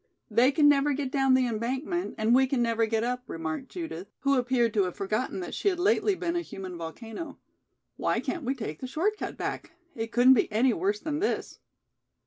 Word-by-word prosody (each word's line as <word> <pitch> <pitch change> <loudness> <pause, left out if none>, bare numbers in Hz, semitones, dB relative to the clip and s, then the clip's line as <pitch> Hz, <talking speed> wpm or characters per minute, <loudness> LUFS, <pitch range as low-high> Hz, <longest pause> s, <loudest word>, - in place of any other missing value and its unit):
"They 250 +3 +5
can 290 +1 +4
never 290 0 +4
get 275 -1 -3
down 270 -2 +3
the 260 -1 +3
embankment 260 - -2
and 220 +2 +2
we 265 +1 +5
can 265 -1 0
never 230 -1 +1
get 225 0 0
up," 250 +1 -1
remarked 165 +10 -4
Judith, 320 - -6
who 275 0 +2
appeared 245 -3 +1
to 200 -3 +3
have 180 - -4
forgotten 215 - -2
that 355 - -6
she - - -2
had 375 -3 +2
lately 405 +2 +2
been 345 -2 -2
a 345 - +1
human 190 - -7
volcano. 220 - -7 0.6
"Why - - 0
can't 335 - -3
we 265 +2 -1
take 185 - -6
the 255 - -5
short 355 +11 0
cut - - -6
back? - - -4 0.2
It 225 0 -4
couldn't 245 +2 +6
be 235 - +2
any 235 +4 +3
worse 200 +3 0
than 300 +2 -3
this." 415 - -2
255 Hz, 210 wpm, -28 LUFS, 220-290 Hz, 0.6 s, couldn't